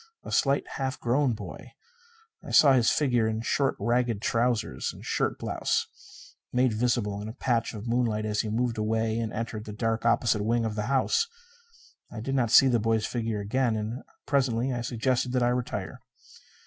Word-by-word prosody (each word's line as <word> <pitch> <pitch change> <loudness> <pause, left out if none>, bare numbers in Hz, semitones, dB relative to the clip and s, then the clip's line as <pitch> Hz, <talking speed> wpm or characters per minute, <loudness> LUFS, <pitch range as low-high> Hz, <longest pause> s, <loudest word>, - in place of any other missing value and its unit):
A - - -8
slight, 140 0 +2
half 135 0 -2
grown 125 +2 +1
boy. 110 - -9 0.7
I - - -9
saw 140 -3 +6
his 120 -4 +4
figure 125 -6 +2
in 110 0 -2
short 135 +3 +1
ragged 120 -2 0
trousers 115 - 0
and - - -13
a - - -12
shirt - - 0
blouse - - -4 0.2
made 125 -1 +2
visible 110 -3 0
in 105 - -6
a 110 - -6
patch 120 -3 -1
of 105 +1 -7
moonlight 115 -3 0
as 105 -1 0
he 110 - -4
moved 115 +1 -1
away 110 +1 0
and 115 -1 -2
entered 110 -1 -5
the 105 - -7
dark 115 +1 -1
opposite 115 -2 +2
wing 115 +1 +1
of 110 - -2
the 105 +1 -3
house. 135 - +2 0.8
I 115 - -7
did 135 +5 -3
not 125 -4 +1
see 135 +3 +7
the 120 -3 +2
boy's 110 0 +1
figure 115 -3 -2
again; 115 +3 0
and 110 +4 -4 0.2
presently 130 -3 +1
I 120 - -2
suggested 125 +1 -1
that 125 -1 +2
I 120 - +3
retire. 125 0 -3
115 Hz, 185 wpm, -27 LUFS, 110-125 Hz, 0.8 s, see